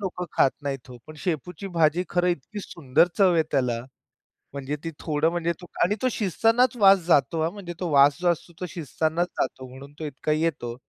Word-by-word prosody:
लोकं 185 -2 -4
खात 135 - +4
नाहीत 135 -3 -4
हो. 125 - -10
पण 155 - -11
शेपूची 180 +2 -4
भाजी 165 0 +2
खरं 180 0 +1
इतकी 175 +6 -3
सुंदर 160 -2 +1
चव 190 -3 +5
आहे 160 - +4
त्याला. 125 -4 0 0.7
म्हणजे 140 +1 -4
ती 165 - -3
थोडं 155 0 +1
म्हणजे 170 -1 -1
तो - - -9 0.2
आणि 190 +4 +2
तो 255 - +2
शिजतानाच 225 +5 +2
वास 195 -2 +7
जातो 160 0 +3
हां. 160 +1 0
म्हणजे 185 -4 -7
तो 180 - -2
वास 140 0 +5
जो 180 - +1
असतो 170 0 -1
तो 180 - -3
शिजतानाच 160 +2 -1
जातो 130 - -2
म्हणून 135 +3 -12
तो 160 - -4
इतका 150 +1 -3
येतो. 155 -7 -1
165 Hz, 200 wpm, -25 LUFS, 145-180 Hz, 0.7 s, वास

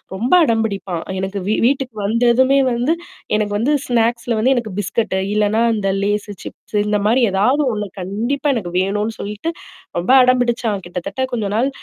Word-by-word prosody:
ரொம்ப 235 +6 -2
அடம்பிடிப்பான். 200 - -1 0.2
எனக்கு 190 +1 -3
வீ 215 - +2
வீட்டுக்கு 265 -3 0
வந்ததுமே 245 +5 +3
வந்து 245 +6 +1 0.4
எனக்கு 205 -1 -1
வந்து 255 +8 +1
ஸ்நாக்ஸ்ல 235 -1 0
வந்து 260 +4 +3
எனக்கு 225 -5 -3
பிஸ்கட்டு. 200 0 -1
இல்லன்னா 210 +1 +2
அந்த 205 -3 -1
லேசு, 205 0 -1
சிப்ஸ் 210 - -7
இந்தமாரி 210 +4 +2
ஏதாவது 250 +10 +2
ஒண்ணு 210 -1 -3
கண்டிப்பா 230 +11 -2
எனக்கு 185 -7 -4
வேணுன்னு 210 +3 -1
சொல்லிட்டு, 210 +10 -4 0.5
ரொம்ப 180 - 0
அடம்பிடிச்சான். 240 -4 +1
கிட்டத்தட்ட 180 +9 -5
கொஞ்ச 225 -3 -1
நாள் 250 +5 +2
220 Hz, 145 wpm, -19 LUFS, 205-245 Hz, 0.5 s, வந்ததுமே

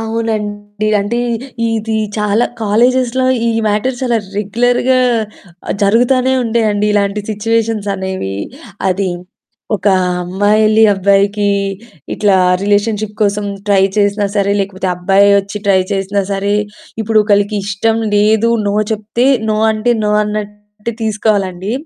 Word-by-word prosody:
అవునండి. 215 -2 -3
అంటే 215 +4 -2 0.5
ఇది 220 0 -2 0.2
చాలా 210 +3 +1 0.2
కాలేజెస్‌లో 250 +4 +2 0.2
ఈ - - +2 0.2
మ్యాటర్స్ 215 +5 -1
చాలా 240 -3 +1 0.2
రెగ్యులర్‌గా 245 +5 +1 0.7
ఆహ్, - - -1
జరుగుతానే 250 +5 +3
ఉండే 230 0 0
అండి 205 0 0
ఇలాంటి 200 0 0
సిచ్యువేషన్స్ 220 0 -1
అనేవి. 190 - -4 0.5
అది 190 +1 0 0.7
ఒక 190 - -8 0.4
అమ్మాయెల్లి, 210 +4 +2
అబ్బాయికి 200 +1 +2 0.6
ఇట్లా 205 -2 +2 0.3
రిలేషన్‌షిప్ 210 +1 0
కోసం 205 0 0 0.2
ట్రై 200 -2 +3 0.2
చేసినా 205 0 +1
సరే, 200 0 +1
లేకపోతే 190 -1 -3
అబ్బాయే 195 +3 +3
ఒచ్చి 200 +1 -7
ట్రై 195 -1 +4
చేసినా 195 +1 -1
సరే, 200 +1 -1 0.5
ఇప్పుడు 220 0 +2
ఒకళ్ళకి 205 0 +1
ఇష్టం 215 +3 0 0.2
లేదు, 215 +2 +3 0.2
నో 200 - 0 0.2
చెప్తే 220 +3 -1 0.2
నో. 215 - +1 0.2
అంటే, 220 +3 0
నో 210 - 0
అన్నట్టు 210 +1 -6
తీసుకోవాలండి. 205 -3 -1
210 Hz, 120 wpm, -14 LUFS, 200-225 Hz, 0.7 s, ట్రై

